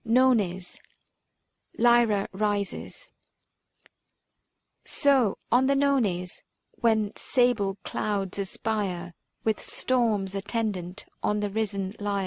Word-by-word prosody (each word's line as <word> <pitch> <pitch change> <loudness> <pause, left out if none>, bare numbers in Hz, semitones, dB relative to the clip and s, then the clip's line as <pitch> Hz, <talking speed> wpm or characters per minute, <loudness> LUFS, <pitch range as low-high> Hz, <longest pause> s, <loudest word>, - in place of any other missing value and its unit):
NONES. 225 -7 +2 1.0
LYRA 235 -4 +4
RISES. 205 0 -3 1.7
So 270 -8 +2
on 250 +3 +4
the 275 - +3
Nones, 230 -11 +1 0.3
when 220 -3 +1
sable 230 -6 +1
clouds 200 -2 -2
aspire 190 -3 -2 0.3
With 220 -1 0
storms 220 -7 0
attendant 200 -2 -3 0.2
on 210 0 +1
the 205 -1 -2
risen 200 -2 -2
Lyre. 205 -1 -1
210 Hz, 90 wpm, -27 LUFS, 195-235 Hz, 1.7 s, LYRA